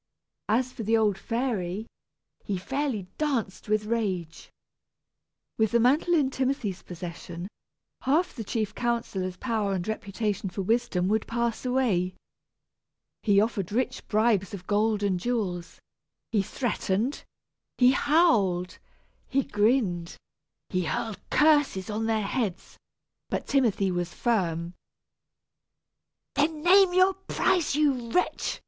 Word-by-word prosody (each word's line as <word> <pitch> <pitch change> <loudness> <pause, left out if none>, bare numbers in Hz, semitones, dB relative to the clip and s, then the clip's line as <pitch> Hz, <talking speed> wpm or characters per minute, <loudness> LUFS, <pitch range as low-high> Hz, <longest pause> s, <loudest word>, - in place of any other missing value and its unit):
As 250 +4 +2
for 235 - -6
the 225 +1 +2
old 210 -3 +2
fairy, 215 -3 -2 0.6
he 200 - -2
fairly 265 +1 -2 0.2
danced 250 -11 -2
with 215 0 +1
rage. 195 -8 -2 1.1
With 220 -1 +2
the 235 - +5
mantle 290 +9 +3
in 280 -4 +2
Timothy's 260 -8 -1
possession, 175 0 -7 0.5
half 310 +7 +1
the 230 - -5
chief 215 0 -2
counsellor's 215 -7 -2
power 215 -3 -1
and 180 0 -3
reputation 210 -2 -2
for 195 +2 -4
wisdom 220 -4 +1
would 220 +1 +1
pass 235 +1 -1
away. 210 -9 +1 1.1
He 200 -2 +4
offered 205 -4 0
rich 250 +4 -1
bribes 210 -3 +2
of 180 -2 -11
gold 210 +1 +1
and 190 -3 +1
jewels, 185 -6 -2 0.5
he 210 - +3
threatened, 225 +2 -1 0.5
he 250 0 +6
howled, 210 - +2 0.5
he 275 0 +1
grinned, 205 -7 +1 0.5
he 185 -1 0
hurled 215 +3 -3
curses 290 -10 +3
on 220 +1 -1
their 220 -1 +1
heads, 200 -4 -3 0.5
but - - -2
Timothy 225 -8 +2
was 175 -1 -2
firm. 175 -7 -1 1.6
"Then 300 +1 0
name 375 +1 +6
your 370 +1 +4
price, 365 -4 0
you 270 -6 +1
wretch!" 360 +9 0
220 Hz, 120 wpm, -27 LUFS, 190-260 Hz, 1.6 s, he